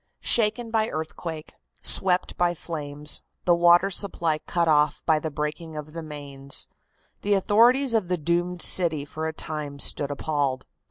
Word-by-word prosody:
Shaken 225 +1 +2
by 220 -1 +1
earthquake, 160 0 -6 0.3
swept 180 -1 +3
by 175 0 +1
flames, 150 -3 -2 0.2
the 175 - +4
water 175 +3 +4
supply 170 -5 -1
cut 170 +1 -1
off 150 -1 +2
by 160 -2 +3
the 160 - -4
breaking 150 +2 -5
of 150 0 -8
the 165 - -6
mains, 140 -3 -4 0.5
the 205 0 +1
authorities 235 +7 +3
of 215 -5 +1
the 180 0 -1
doomed 175 +2 -1
city 160 -6 +4
for 155 +2 -5
a - - -2
time 150 -2 -5
stood 140 0 0
appalled. 140 -3 -2
160 Hz, 155 wpm, -25 LUFS, 150-180 Hz, 0.5 s, the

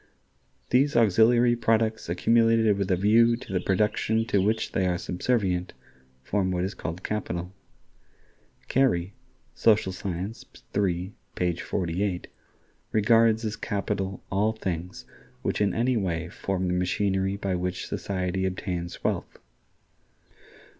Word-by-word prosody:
"These 140 +3 +3
auxiliary 120 +2 +5
products 110 -3 +1
accumulated 115 +3 +3
with 100 -1 -2
a 95 - +4
view 115 +5 +4
to 95 - -9
the 90 - +2
production 105 +3 +1
to 100 - +3
which 110 +3 0
they 95 -1 +1
are 90 -1 0
subservient" 90 -1 -1 0.5
form 95 +6 0
what 90 -1 -1
is 95 +2 -2
called 85 +2 -6
capital. 90 -4 -3 1.1
Carey 100 -9 +1 0.4
("Social 105 -4 +3
Science," 95 +3 -5 0.3
iii, 95 -1 0 0.2
page 90 -1 -1
48) 90 0 -2 0.7
regards 115 +1 +4
as 105 - -2
capital 95 -1 -3
all 105 +3 +2
things 90 -4 -5 0.4
which - - -1
in 100 -2 +3
any 120 +3 +1
way 85 -4 -2
form 95 0 -2
the 90 - 0
machinery 95 +2 0
by 100 -2 -2
which 90 0 -2
society 95 -1 -2
obtains 90 -2 -4
wealth. - - -2
100 Hz, 125 wpm, -26 LUFS, 90-110 Hz, 1.1 s, auxiliary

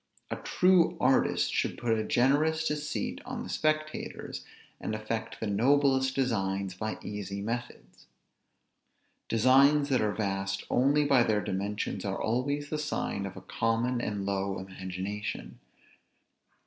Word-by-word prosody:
A - - 0
true 180 -2 +3
artist 130 +1 +2
should - - 0
put 115 -2 +1
a 110 - -1
generous 150 +7 +2
deceit 150 -7 -3
on - - -5
the - - -8
spectators, 155 0 -2 0.4
and 110 - -3
effect 110 +1 -4
the - - -3
noblest 130 +5 +3
designs 100 -7 0
by 110 +4 -4
easy 100 -1 -5
methods. 115 +4 -6 1.2
Designs 140 +5 +5
that 130 -4 +3
are 105 -1 +1
vast 95 -2 -2
only 145 +4 +3
by 135 -3 +5
their 110 -3 +2
dimensions 100 +1 -3
are 95 -1 -2
always 140 +6 -1
the 155 - -1
sign 150 -9 -2
of 95 - -9
a - - -8
common 115 +5 0
and 105 -3 -3
low 100 -1 -1
imagination. 95 +2 -5
115 Hz, 135 wpm, -29 LUFS, 100-140 Hz, 1.2 s, Designs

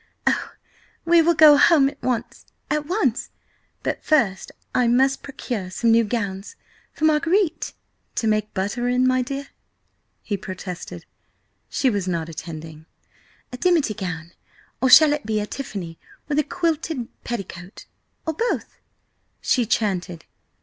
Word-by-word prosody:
Oh, - - 0 0.5
we 340 0 +6
will 340 +1 +3
go 300 -2 +8
home 285 -2 +6
at 280 0 -7
once–at 290 +4 -3
once! 305 - 0 0.5
But - - -2
first 225 -12 +1 0.2
I 250 - +3
must 265 +3 +3
procure 240 -8 -5
some 225 +5 +1
new 230 +1 +5
gowns 205 - -3 0.4
from 310 - -2
Marguerite!" 320 +2 +2 0.4
"To - - -1
make 215 -1 +1
butter 205 +6 -1
in, 250 +1 +2 0.2
dear?" 275 +2 -5 0.7
he 205 - -2
protested. 185 -2 -7 0.6
She 260 - +1
was 200 -3 -2
not 170 -2 -2
attending. 160 -1 -8 0.7
"A - - -4
dimity 325 -7 +2
gown–or 180 +6 -5
shall 300 +3 +8
it 295 - -3
be 215 -1 +1
of 210 - -5
tiffany 190 -11 -6 0.3
with 295 0 +1
a - - +3
quilted 320 -6 -2 0.2
petticoat? 195 -5 -7 0.4
Or 320 - -1
both?" 465 +10 -2 0.6
she 245 -4 +1
chanted. 185 -7 -1
240 Hz, 130 wpm, -23 LUFS, 195-295 Hz, 0.7 s, go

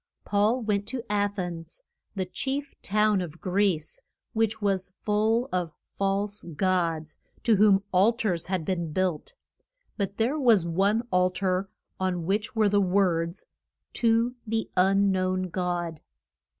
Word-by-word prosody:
Paul 215 +5 +2
went 205 -2 -1
to 255 -3 -3
A 205 0 +2
thens, 180 - -6 0.3
the 190 -2 -1
chief 275 +9 -3
town 210 -1 +2
of 170 -1 -7
Greece, 190 - 0 0.3
which 225 -1 0
was 195 -3 -1
full 220 +4 +2
of 175 -4 -2 0.2
false 200 +1 -1
gods, 165 -4 0 0.2
to 225 -3 +4
whom 200 -1 +5
al 190 +5 +5
tars 200 -9 -1
had 185 -3 -2
been 170 -3 -2
built. 185 - -1 0.6
But 200 -1 -2
there 255 +7 +1
was 225 - +4
one 200 +7 +1
al 180 0 +4
tar 185 +1 -1 0.3
on 180 -3 -1
which 205 +5 -1
were 215 -2 +4
the 205 0 +3
words, 180 -2 +1 0.5
TO 230 +1 +2
THE 225 0 -2
UN 195 +2 +4
KNOWN 185 0 0
GOD. 175 -3 -2
195 Hz, 140 wpm, -27 LUFS, 180-215 Hz, 0.6 s, whom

